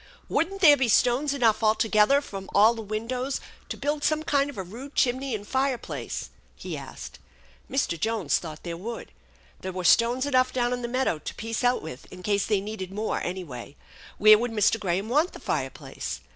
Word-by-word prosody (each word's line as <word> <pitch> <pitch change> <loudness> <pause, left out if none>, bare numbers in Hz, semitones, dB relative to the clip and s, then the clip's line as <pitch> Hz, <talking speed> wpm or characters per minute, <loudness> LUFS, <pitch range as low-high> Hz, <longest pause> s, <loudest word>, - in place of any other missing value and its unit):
" - - -31
Wouldn't 390 +4 -1
there 295 -5 +8
be 265 -2 +1
stones 250 +6 +3
enough 230 -6 +2
all 215 0 +4
together 225 +6 +4
from 195 -8 -8
all 215 +3 +7
the 225 - -6
windows 230 +5 -3 0.3
to - - -4
build 290 +1 -2
some 310 0 +1
kind 285 -2 +1
of 285 - -9
a 190 - -3
rude 245 +10 -10
chimney 260 0 +1
and 205 -1 -7
fireplace? 265 -2 -2
" - - -34
he - - -6
asked. - - -9 0.5
Mr. 260 - 0
Jones 220 -3 +1
thought 155 -3 -9
there 170 -1 -4
would. 225 +7 -7 0.5
There 190 - -5
were 185 0 -5
stones 235 +8 +4
enough 255 -2 +2
down 245 -1 0
in 245 - -3
the 240 - -3
meadow 255 -9 0
to - - -7
piece 225 +2 -4
out 245 0 +2
with 155 -5 -9
in 185 0 -11
case 200 0 +1
they 210 -3 +2
needed 200 -3 -6
more, 215 +2 -2
anyway. 155 -8 -6 0.4
Where 215 0 +8
would 240 +1 -1
Mr. 225 +1 +2
Graham 190 +1 -1
want 300 +9 +2
the - - -9
fire - - -1
place? - - -7
225 Hz, 205 wpm, -26 LUFS, 200-260 Hz, 0.5 s, there